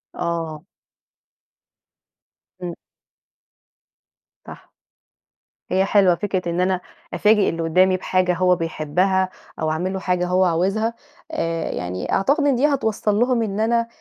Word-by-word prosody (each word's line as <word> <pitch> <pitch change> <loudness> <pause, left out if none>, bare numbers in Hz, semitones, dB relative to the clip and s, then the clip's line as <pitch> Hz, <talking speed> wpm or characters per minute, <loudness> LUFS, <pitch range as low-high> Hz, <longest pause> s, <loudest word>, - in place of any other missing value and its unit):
آه. 165 -2 -3 2.0
إمم. 175 -1 -4 1.7
صح. - - -13 1.0
هي 190 +1 +3
حلوة 195 -3 +4
فكرة 185 -2 -2
إن 170 +1 0
أنا 185 0 +1 0.3
أفاجئ 210 -1 +3
اللي 165 0 -3
قُدّامي 185 +3 +3
بحاجة 185 -1 +1
هو 180 +1 +3
بيحبّها 180 +3 0 0.3
أو 155 0 0
أعمل 180 +4 -2
له 190 - -3
حاجة 180 -1 0
هو 185 +1 +3
عاوزها، 195 +7 0 0.4
آآ 165 - -2
يعني 90 +1 -4
أعتقد 280 +10 +2
إن 275 - +3
دي 255 +4 +2
هتوصّل 220 -7 0
لهم 245 -1 +2
إن 205 -1 -3
أنا 230 +1 +1
185 Hz, 125 wpm, -21 LUFS, 170-210 Hz, 2.0 s, حلوة